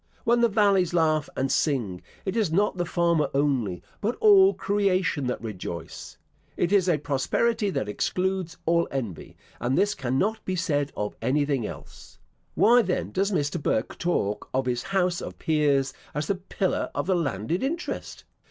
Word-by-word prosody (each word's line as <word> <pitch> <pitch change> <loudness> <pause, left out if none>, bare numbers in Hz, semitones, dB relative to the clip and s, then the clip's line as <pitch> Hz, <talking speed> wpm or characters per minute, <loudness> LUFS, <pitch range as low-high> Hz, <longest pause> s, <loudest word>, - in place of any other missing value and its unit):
When 235 0 +3
the 235 - +4
valleys 195 -4 +3
laugh 155 -3 +2
and 135 +1 0
sing, 115 - 0 0.2
it 190 +1 -2
is 215 -8 +1
not 200 +5 +2
the 175 -2 -2
farmer 170 -3 +1
only, 130 -11 0 0.2
but 225 +4 0
all 395 -2 +6
creation 185 -8 0
that 125 - -2
rejoice. 90 -6 -7 0.4
It 175 - +1
is 190 -3 +4
a 165 - +3
prosperity 205 - 0
that 105 - -2
excludes 180 - -2
all 170 +1 +2
envy; 115 -11 -5 0.2
and 125 +2 0
this 205 +2 +3
cannot 140 - -1
be 185 - -2
said 145 -4 0
of 105 0 -3
anything 140 -3 +1
else. 75 -2 -11 0.4
Why 240 +3 +6
then, 185 -5 -2
does 195 +2 0
Mr. 150 -2 -1
Burke 110 - -1
talk 105 - -1
of 130 0 +1
his 125 -1 -1
house 180 -3 0
of - - -7
peers 140 -4 +1 0.2
as 150 0 -1
the 200 - +1
pillar 190 0 -2
of - - -1
the 190 - +2
landed 150 - -1
interest? 330 +6 -4
165 Hz, 165 wpm, -26 LUFS, 135-195 Hz, 0.4 s, all